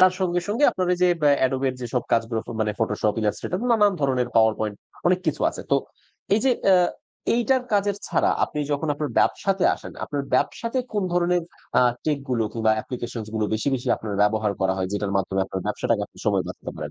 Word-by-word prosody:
তার 185 0 +7
সঙ্গে, 175 -1 +1
সঙ্গে 235 +8 +2
আপনার 185 -1 -2
ওই 180 - +1
যে 180 - +6 0.3
অ্যাডোবের 130 0 +1
যেসব 120 0 -2
কাজগুলো 115 0 +1 0.2
মানে 105 -1 +1
ফটোশপ, 105 -1 +1
ইলাস্ট্রেটর 175 - -2
নানান 210 -3 +5
ধরনের 130 -3 +1
পাওয়ার 110 -1 +5
পয়েন্ট 105 -2 -2 0.3
অনেক 180 +1 +4
কিছু - - 0
আছে। - - -8
তো - - +5 0.6
এই 215 - +2
যে, 265 - +4 0.2
অ্যা 190 -1 +7 0.6
এইটার 250 +2 +2
কাজের 205 0 +2
ছাড়া - - +2
আপনি 150 - -5
যখন 150 +2 -1
আপনার 150 -1 -3
ব্যবসাতে 195 -1 +1
আসেন, - - -10
আপনার 145 -1 -3
ব্যবসাতে 230 +3 0
কোন 210 - 0
ধরনের 175 0 +2 0.4
আ - - +6 0.2
টেকগুলো 140 -6 0
কিংবা 110 -1 +1
অ্যাপ্লিকেশনসগুলো 110 -2 -4
বেশি, 110 +6 -1
বেশি 125 - -3
আপনার 105 -2 -5
ব্যবহার 105 0 +2
করা 95 0 +2
হয়, 95 0 -1
যেটার 105 -1 -2
মাধ্যমে 95 0 0
আপনার 95 0 -4
ব্যবসাটাকে - - 0
আপনি - - -21
সময় - - +2
বাঁচাতে - - -7
পারেন? 75 -2 -5
130 Hz, 190 wpm, -24 LUFS, 110-180 Hz, 0.6 s, তার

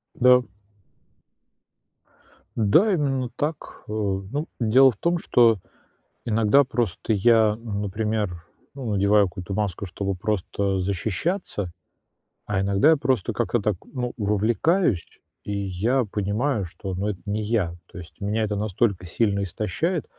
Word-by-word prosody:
Да. 125 0 +5 2.1
Да, 160 - +4
именно 135 -6 0
так, 150 +1 -4
э. - - -8
Ну, 105 - -2
дело 130 +4 +6
в 105 - -15
том, 170 +6 +1
что 115 - +4 0.7
иногда 115 +5 +4
просто 115 -4 -2
я, 110 +1 +4
например, 105 -4 -3 0.3
ну, 125 -6 -4
надеваю 100 0 +4
какую-то 90 +2 -6
маску, 100 -2 -2
чтобы 100 +2 -3
просто 100 0 -1
защищаться, 100 - -2 0.7
а 100 -2 -1
иногда 100 +10 +4
я 160 - +4
просто 130 -7 0
как-то 120 0 0
так, 105 -1 0
ну, 125 -2 -4
вовлекаюсь, 110 - +1 0.4
и 105 - -6
я 100 +6 0
понимаю, 105 +4 -1
что, 95 +2 -7
ну, 100 +3 -2
это 100 -3 -3
не 105 +1 -2
я. 105 -6 0 0.2
То - - -11
есть 90 +3 -12
меня 105 +2 0
это 105 -1 -1
настолько 100 -2 0
сильно 100 +3 0
истощает, 110 - -2
105 Hz, 130 wpm, -24 LUFS, 100-125 Hz, 2.1 s, дело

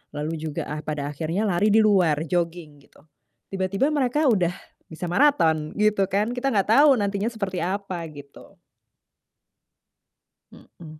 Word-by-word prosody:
lalu 150 +2 -3
juga 155 -2 -4
ah 150 0 -4
pada 150 -1 -4
akhirnya 165 +8 -3
lari 195 +3 +1
di 220 - +6
luar, 175 -7 +3
joging, 165 -3 -3
gitu. 145 - -23 0.5
Tiba-tiba 195 +8 0
mereka 295 +1 0
udah 180 -6 +1 0.4
bisa 170 +2 -5
maraton 165 - +2
gitu 210 -2 +2
kan, 210 +3 0
kita 270 +2 0
nggak 200 0 +1
tahu 285 0 +6
nantinya 200 +2 -1
seperti 195 -4 -4
apa, 185 -2 -3
gitu. 145 -1 -15 1.9
Mhm. 155 -2 -15
180 Hz, 135 wpm, -24 LUFS, 155-210 Hz, 1.9 s, di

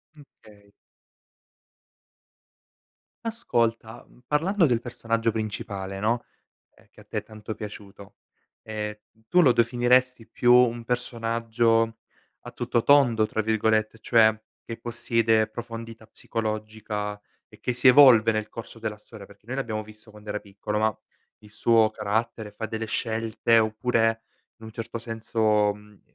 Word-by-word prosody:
Mh 150 - -14 0.2
...kay 100 -1 -19 2.5
Ascolta, 115 - -2
mhmm, - - -23
parlando 170 +5 +2
del 120 -3 +1
personaggio 115 -1 -1
principale, 100 -3 -5
no, 115 +4 0 0.5
ehm, - - -25
che - - -18
a - - -16
te - - -4
è - - -3
tanto 110 0 -8
piaciuto, 100 -1 -10 0.5
ehm, 105 -1 -4 0.3
tu 180 +7 +5
lo 135 -6 +6
definiresti 120 +1 +2
più 120 0 +3
un 120 -1 +4
personaggio 115 -1 0 0.4
“a - - -10
tutto 120 - -1
tondo”, 120 -6 +4
tra 110 - -2
virgolette, 110 0 +1
cioè 110 -1 +4 0.3
che 115 - -7
possiede 115 -1 +1
profondità 115 0 -8
psicologica 110 -2 -4 0.3
e - - -19
che 125 - -1
si 125 +2 +4
evolve 125 -4 +7
nel 110 -1 -2
corso 115 +1 -9
della 110 -2 -5
storia, 105 -1 -13
perché 100 +1 -20
noi 130 +3 -4
l’abbiamo 110 -5 -3
visto 110 +1 -16
quando 105 0 -15
era 105 - -3
piccolo, 105 +1 -4
ma 110 -1 0 0.4
il 105 - -17
suo 110 0 +3
carattere 110 +1 -2
fa 110 +2 -5
delle 110 0 -4
scelte 115 0 +1
oppure, 115 0 +1 0.4
in 110 - -14
un 110 - -10
certo 115 +1 -6
senso, 110 -2 0
mhmm, 105 -1 -18
110 Hz, 140 wpm, -25 LUFS, 110-115 Hz, 2.5 s, evolve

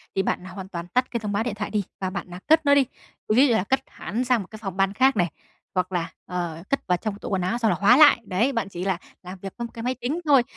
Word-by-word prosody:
thì 195 - +2
bạn 180 - -2
hoàn 190 0 -8
toàn 170 -2 -6
tắt 250 +7 0
cái 235 - -1
thông 210 -2 -4
báo 205 +2 0
điện 230 -4 -3
thoại 205 0 -4
đi 210 -2 0 0.2
và 185 - 0
bạn, 185 -2 -6
à, 180 - -7
cất 315 0 +5
nó 285 - +6
đi. 275 -2 +5 0.5
Ví 270 +5 +6
như 240 - +3
là 220 - +2
cất 265 +7 +1
hẳn 235 +6 -4
sang 250 -3 +2
một 185 - -9
cái 220 - -9
phòng 195 -3 -5
ban 195 0 +2
khác 265 +4 +4
này, 175 -2 +3 0.5
hoặc 185 0 0
là, 175 -2 -1 0.2
ờ, 170 -2 -4
cất 275 - -1
vào 180 -1 +3
trong 205 +1 -4
tủ - - -6
quần 190 -2 0
áo 185 +7 0
xong 225 -3 +2
là - - 0
khóa 225 +6 +6
lại. 290 -6 +7
Đấy, 205 +7 +1
bạn 225 -5 -1
chỉ 180 0 -5
là 190 -3 +1 0.3
làm 185 +1 -8
việc 195 -1 -6
với 235 - -3
một 235 - -9
cái 230 - -7
máy 255 +1 0
tính 285 +8 -1
thôi, 275 -5 +6
205 Hz, 305 wpm, -24 LUFS, 185-245 Hz, 0.5 s, lại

